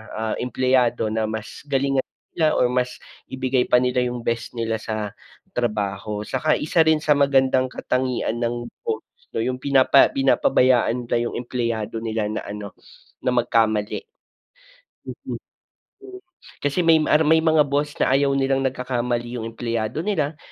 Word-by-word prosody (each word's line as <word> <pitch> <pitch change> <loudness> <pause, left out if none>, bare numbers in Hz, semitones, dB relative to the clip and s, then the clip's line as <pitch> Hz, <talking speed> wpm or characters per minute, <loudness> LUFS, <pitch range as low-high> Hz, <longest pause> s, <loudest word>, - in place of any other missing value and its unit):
ah, 110 0 -2
empleyado 125 -2 +1
na 110 0 0
mas 110 +3 -6
galingan 135 -1 +1 0.3
nila 155 -2 +3
or 125 - +4
mas 125 0 -1 0.3
ibigay 130 -1 +1
pa 125 - +5
nila 125 0 +1
yung 120 0 -4
best 115 0 -1
nila 115 -1 0
sa 110 -2 -3 0.5
trabaho. 105 -2 -2
Saka 140 +4 +1
isa 160 +2 +3
rin 160 -1 +4
sa 150 -2 +3
magandang 135 -2 +3
katangian 125 -3 -1
ng 120 0 -2 0.2
boss 450 -2 -2 0.3
'no, - - -2
yung 125 +2 -1
pinapa 135 0 +4
pinapabayaan 125 -2 +2
nila - - 0 0.2
yung - - -7
empleyado 115 -2 -3
nila 110 -2 -1
na 105 - -4
ano, 105 0 -7 0.5
na 125 - +1
magkamali. 110 - +1 1.0
Oo, - - -6 0.7
mm. 380 -1 -10 0.4
Kasi 145 +5 0
may 160 -1 +5
may 160 +1 +4
mga 160 -2 +4
boss 145 +1 -1
na 130 - +2
ayaw 140 0 +3
nilang 135 0 +1
nagkakamali 125 -2 -2
yung 115 +1 -4
empleyado 115 - -3
nila, 155 -7 -1
125 Hz, 145 wpm, -22 LUFS, 115-140 Hz, 1.0 s, pa